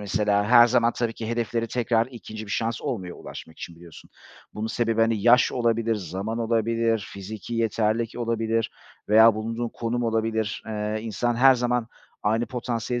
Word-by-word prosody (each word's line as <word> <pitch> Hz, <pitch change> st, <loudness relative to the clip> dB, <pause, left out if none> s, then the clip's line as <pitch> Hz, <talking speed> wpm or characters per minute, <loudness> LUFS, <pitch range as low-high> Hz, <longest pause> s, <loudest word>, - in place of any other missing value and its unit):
mesela 105 Hz, 0 st, +1 dB
her 120 Hz, 0 st, +8 dB
zaman 120 Hz, -1 st, +2 dB
tabii 115 Hz, -1 st, -2 dB
ki 110 Hz, -1 st, -6 dB
hedeflere 115 Hz, 0 st, -1 dB
tekrar 115 Hz, -1 st, +1 dB
2. 110 Hz, -4 st, -9 dB
bir -, -, -10 dB
şans 115 Hz, +1 st, -1 dB
olmuyor 100 Hz, -11 st, -4 dB
ulaşmak 80 Hz, -, -10 dB
için 85 Hz, -, -8 dB
biliyorsun. 85 Hz, -1 st, -14 dB, 0.4 s
Bunun 105 Hz, +1 st, -3 dB
sebebi, 115 Hz, 0 st, 0 dB
hani, 115 Hz, -2 st, +2 dB
yaş 120 Hz, +1 st, +5 dB
olabilir, 115 Hz, -2 st, +1 dB
zaman 100 Hz, +3 st, -4 dB
olabilir, 115 Hz, -2 st, 0 dB
fiziki 105 Hz, +3 st, -7 dB
yeterlilik 115 Hz, 0 st, 0 dB
olabilir 115 Hz, -1 st, -1 dB, 0.4 s
veya 110 Hz, +1 st, +7 dB
bulunduğun 115 Hz, +2 st, -3 dB
konum 120 Hz, +1 st, -3 dB
olabilir. 110 Hz, -1 st, -1 dB
Eee, 105 Hz, 0 st, -3 dB
insan 115 Hz, +2 st, -1 dB
her 135 Hz, +2 st, +7 dB
zaman 125 Hz, -1 st, 0 dB, 0.4 s
aynı 115 Hz, +3 st, +1 dB
potansiyele 120 Hz, -1 st, -3 dB
115 Hz, 155 wpm, -25 LUFS, 110-120 Hz, 0.4 s, her